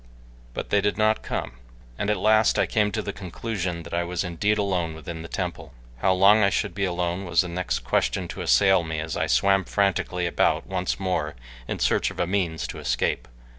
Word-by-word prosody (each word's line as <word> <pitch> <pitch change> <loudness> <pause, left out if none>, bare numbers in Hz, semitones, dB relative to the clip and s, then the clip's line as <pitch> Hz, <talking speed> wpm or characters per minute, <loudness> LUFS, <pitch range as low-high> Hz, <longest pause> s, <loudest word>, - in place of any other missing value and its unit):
But - - -5
they 100 - +4
did 105 0 0
not 110 0 +2
come, - - -4 0.4
and 100 - -2
at 105 - +2
last 110 +3 +4
I - - +3
came 105 -2 +1
to 110 0 -2
the 100 - -4
conclusion 90 -2 -4
that 85 - -10
I 85 0 +1
was 85 +1 -2
indeed 105 +4 0
alone 90 -6 -1
within 80 +1 -7
the 80 - -7
temple. 65 - -5 0.2
How 95 - +2
long 100 +4 +6
I 100 - +5
should 100 -1 -1
be 100 +1 -1
alone 90 +1 -2
was 85 -3 +3
the 90 - -4
next 90 +1 -2
question - - 0
to - - -6
assail 90 +10 +4
me 80 -1 -3
as 80 0 -4
I - - 0
swam 95 -1 +3
frantically 95 -2 0
about 85 - +1
once 95 0 -2
more 90 -6 -1 0.3
in - - -3
search - - +2
of - - -10
a 90 - +2
means 90 -3 -1
to - - -6
escape. - - -1
90 Hz, 210 wpm, -25 LUFS, 85-100 Hz, 0.4 s, long